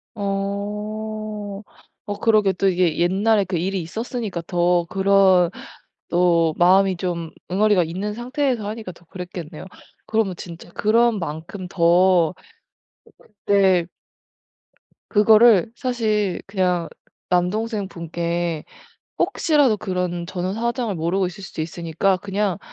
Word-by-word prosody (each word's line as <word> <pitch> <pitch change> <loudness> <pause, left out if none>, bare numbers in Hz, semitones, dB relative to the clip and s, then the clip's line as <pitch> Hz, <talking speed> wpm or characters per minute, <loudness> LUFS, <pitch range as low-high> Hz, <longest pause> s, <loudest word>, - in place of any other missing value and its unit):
어, 210 +1 -4 0.4
어 205 0 -5
그러게 215 -4 +3
또 195 +2 0
이게 180 -3 +2
옛날에 195 +4 +2
그 185 -3 -2
일이 190 +2 -1
있었으니까 215 +1 -4
더 175 -1 +2
그런 190 -2 +4 0.6
또 170 -2 +3
마음이 185 +1 +4
좀 170 -3 -3 0.2
응어리가 200 -1 +3
있는 190 +6 -4
상태에서 250 -1 -2
하니까 215 -2 -6
더 175 - -21
그랬겠네요. 175 -3 -8 0.4
그러면 220 -5 0
진짜 170 0 -10
그런 230 +1 +2
만큼 165 +4 -6
더 175 -1 +4 1.1
네. 190 -4 +3 1.2
그거를 220 0 +5
사실 215 -6 -1
그냥 180 -4 0 0.4
남동생분께 175 -4 -1 0.6
혹시라도 300 - +2
그런 180 -4 -3
전후 185 +1 -3
사정을 235 -2 -2
모르고 180 +4 0
있을 180 +3 -8
수도 160 - -5
있으니까 170 +3 -1
그냥 200 -1 -2
190 Hz, 245 characters per minute, -22 LUFS, 175-215 Hz, 1.2 s, 그거를